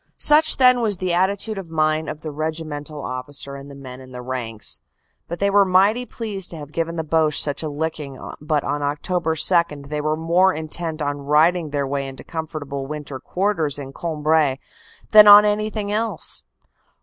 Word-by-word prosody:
Such 310 +1 +5
then 250 -1 +5
was 210 -4 0
the 180 0 -1
attitude 195 +4 0
of 180 -4 -9
mind 155 0 0
of 155 - -7
the 155 - -6
regimental 155 -1 -5
officer 135 +2 -5
and 140 +1 -10
the 140 - -11
men 130 -2 -10
in 130 0 -13
the 125 -1 -8
ranks. 120 -4 -3 0.5
They 200 +4 -1
were 200 0 +5
mighty 200 +6 +3
pleased 205 -5 -6
to 165 - -8
have 145 -1 -9
given 165 +1 -2
the 160 - -2
Boche 155 -1 +1
such 145 -2 +1
a 155 - -3
licking 150 -2 -4 0.2
but 150 -1 0
on 145 +1 -2
Oct. 165 +2 +1
2 - - -12
they 150 0 -2
were 155 +1 -1
more 175 +4 +2
intent 160 0 -3
on 145 0 -2
righting 155 +3 +2
their 140 -1 -1
way 140 0 -3
into 135 0 -10
comfortable 150 -4 -5
winter 145 -2 -6
quarters 180 -7 -1
in 135 -1 -8
Cambrai 155 -4 0 0.5
than 210 -1 +9
on 205 0 +10
anything 210 0 -1
else. 225 +2 -2
155 Hz, 180 wpm, -21 LUFS, 145-185 Hz, 0.5 s, on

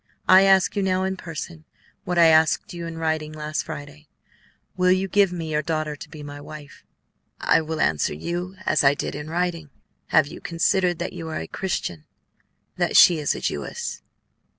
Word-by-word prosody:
I 190 +1 +7
ask 190 0 +4
you 200 - +1
now, 185 -1 +1
in 190 0 -1
person, 165 -2 -8 0.4
what 180 - -2
I 170 - +7
asked 160 +1 +3
you 170 -1 -6
in 165 -1 -7
writing 160 -1 -2
last 155 0 -3
Friday, 145 +1 -9 0.7
will 180 0 +3
you 185 +1 +2
give 200 -1 +3
me 165 -3 -5
your 150 0 +1
daughter 155 -1 -2
to - - -11
be 150 -2 -10
my 145 0 -8
wife?" 145 -1 -11 0.6
"I - - +3
will 160 0 -4
answer 75 -1 +1
you 175 - -4
as 155 - +2
I 140 +1 +5
did - - -4
in 150 +2 -7
writing. 170 -2 -2 0.4
Have 155 - +4
you 155 +4 -10
considered 175 +1 +1
that 175 +2 -4
you 165 -1 -6
are 160 - -4
a 80 - -5
Christian; 85 - -4 0.7
that - - +2
she 170 -3 +7
is 150 - 0
a - - -7
Jewess?" 475 - -4
160 Hz, 190 wpm, -23 LUFS, 150-180 Hz, 0.7 s, I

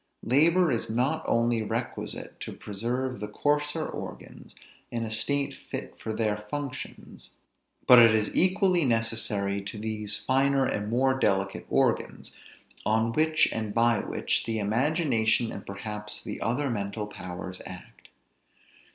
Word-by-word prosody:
Labor 160 +6 +4
is 115 - -1
not 135 +8 0
only 115 0 +2
requisite 110 - -4
to - - -6
preserve 120 +5 -3
the 105 - -4
coarser 150 +7 0
organs, - - -9 0.3
in 115 -1 -3
a 110 - -5
state 140 +6 0
fit - - -7
for 110 - -3
their 110 -1 0
functions; 140 -1 -7 0.5
but 125 -1 +9
it 115 -2 +7
is 105 -1 0
equally 185 -1 +3
necessary 110 -4 0
to 100 +2 -7
these 105 -1 -3
finer 135 +1 +2
and 105 -4 -2
more 130 +3 +2
delicate 100 -4 0
organs, - - 0 0.5
on 110 +1 +2
which, 155 +2 +3
and 110 -2 -3
by 115 -2 +4
which, - - -1
the 115 -1 -1
imagination 115 0 +1
and 100 - -8
perhaps 105 +1 -6
the - - -6
other 130 +4 0
mental 105 -1 -3
powers 90 -2 -7
act. 90 0 -12
115 Hz, 135 wpm, -28 LUFS, 105-135 Hz, 0.5 s, but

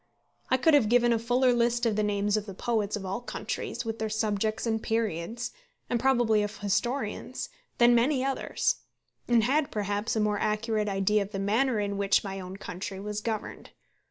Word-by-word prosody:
I 260 - +4
could 320 +5 +4
have 260 -8 +5
given 240 0 +4
a 230 - +1
fuller 245 +2 +3
list 240 0 +2
of 225 -2 +2
the 215 - +1
names 205 0 +1
of 215 0 -2
the 195 - -7
poets 215 -1 -1
of 200 -2 -5
all 190 +5 -3
countries, 245 - -4
with 225 0 -4
their 220 0 -1
subjects 215 0 -1
and 220 -1 0
periods, 225 +1 -2 0.4
and 240 - +2
probably 240 -4 +3
of 205 0 -3
historians, 240 +6 -2 0.3
than 240 -1 +6
many 255 +3 +3
others; 270 -1 0 0.5
and 235 -2 +4
had, 280 +5 +2
perhaps, 205 +1 -2
a - - +1
more 210 -1 +1
accurate 215 0 0
idea 195 +2 +2
of 200 +1 -5
the - - -2
manner 220 +5 +1
in 200 -1 -2
which 200 0 +3
my 195 -1 -5
own 185 +1 -7
country 190 0 -6
was 210 +1 -4
governed. 220 -1 -5
220 Hz, 190 wpm, -28 LUFS, 205-240 Hz, 0.5 s, than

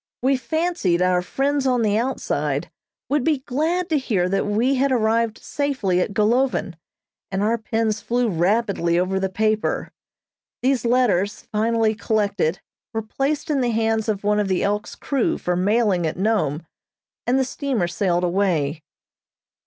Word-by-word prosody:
We 270 +1 +3
fancied 265 - 0
our 180 -1 +2
friends 275 +8 0
on 250 -2 +2
the 210 -1 +2
outside 245 +4 -1 0.4
would 290 -2 +1
be 300 -3 +1
glad 330 +7 0
to 310 -3 +2
hear 200 -9 0
that 195 +2 0
we 225 +6 +2
had 270 +1 +1
arrived 230 -1 +1
safely 260 -11 -1
at 200 - -2
Golovin, 235 -2 +1 0.6
and 195 +1 -1
our 230 +2 +1
pens 220 -1 -1
flew 240 0 0
rapidly 190 -1 +1
over 185 +2 +1
the 190 0 -1
paper. 215 +2 0 0.7
These 255 -2 +1
letters, 225 -5 +2
finally 220 0 +2
collected, 200 -6 0 0.3
were 225 - -1
placed 285 +7 -2
in 280 -3 +1
the 245 - +1
hands 225 -1 0
of 205 -2 -1
one 210 0 +2
of 205 - 0
the 185 -2 0
"Elk's" 205 +1 -1
crew 275 -4 0
for 180 - -1
mailing 195 -2 +2
at 155 - -4
Nome, 180 -7 0 0.6
and 250 +2 +3
the 265 - +2
steamer 260 - -1
sailed 175 -1 0
away. 170 -5 0
220 Hz, 155 wpm, -22 LUFS, 190-255 Hz, 0.7 s, We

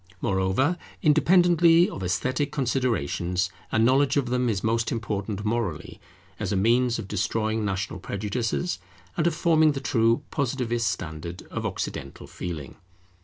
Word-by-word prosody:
Moreover, 100 - +1 0.2
independently 170 +1 +5
of - - -7
esthetic 130 +10 -1
considerations, 110 - 0 0.2
a - - +1
knowledge 135 +5 +3
of 130 -4 0
them 125 -1 +1
is 100 -4 -1
most 115 0 +1
important 105 -2 -3
morally, 105 -8 -2 0.4
as - - -2
a - - +1
means 120 +5 +3
of 110 -4 -6
destroying 110 +2 -1
national 100 0 -2
prejudices, 115 - -2 0.4
and 165 0 +1
of 170 - 0
forming 160 -2 +4
the 135 - -3
true 115 -3 +2
Positivist 120 -4 -1
standard 85 -3 -5
of - - -2
Occidental - - -5
feeling. 80 -6 -7
115 Hz, 135 wpm, -26 LUFS, 100-135 Hz, 0.4 s, independently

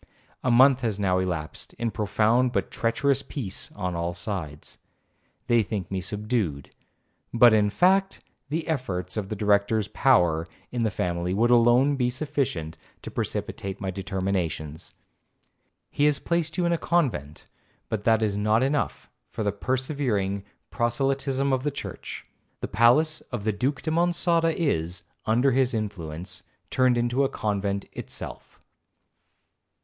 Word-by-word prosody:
A 130 - +1
month 130 +2 +6
has 110 -5 -1
now 95 -2 +2
elapsed 85 -4 -4
in 115 -1 -2
profound 110 +4 +2
but - - -1
treacherous 135 +4 +1
peace 115 -10 -5
on 90 -3 -3
all 85 0 -2
sides. 85 -7 -6 0.7
They 120 -1 +4
think 100 -3 -4
me 95 -1 -1
subdued, 105 - -2 0.6
but 120 -1 +6
'In 105 -1 +4
fact, 190 - +3 0.3
the 160 +2 -2
efforts 95 - -2
of 100 -3 -3
the 110 - -3
Director's 105 +1 +2
power 85 -11 +3 0.2
in 120 - -2
the 110 - +2
family 90 -1 -2
would 120 +4 +3
alone 120 +4 +5
be 125 -2 +1
sufficient 130 - -2 0.2
to - - -7
precipitate 95 0 -4
my 95 -2 -3
determinations. 95 -5 -3 1.0
He 145 - +2
has 150 -1 +4
placed 170 -2 -1
you 180 - +1
in 170 - +2
a 170 - 0
convent, 115 - -1 0.4
but 110 -2 -3
that 110 0 +3
is 105 -2 0
not 110 +3 +2
enough 140 +2 -1 0.2
for - - -4
the 100 - +1
persevering 120 -4 -1 0.3
proselytism 135 +3 0
of 130 - +1
the 145 - 0
church. 140 - -7 0.4
The - - -2
palace 150 +9 +3
of 120 -5 -3
the 110 0 +1
Duke 130 +7 -1
de 160 - -1
Monçada 170 0 +2
is, 90 - -1 0.2
under 120 +5 +3
his 130 -1 +2
influence, 90 -5 -5 0.3
turned 130 -2 +3
into 120 +3 +1
a 135 - +1
convent 100 -1 -2
itself. - - -7
115 Hz, 145 wpm, -26 LUFS, 95-135 Hz, 1.0 s, month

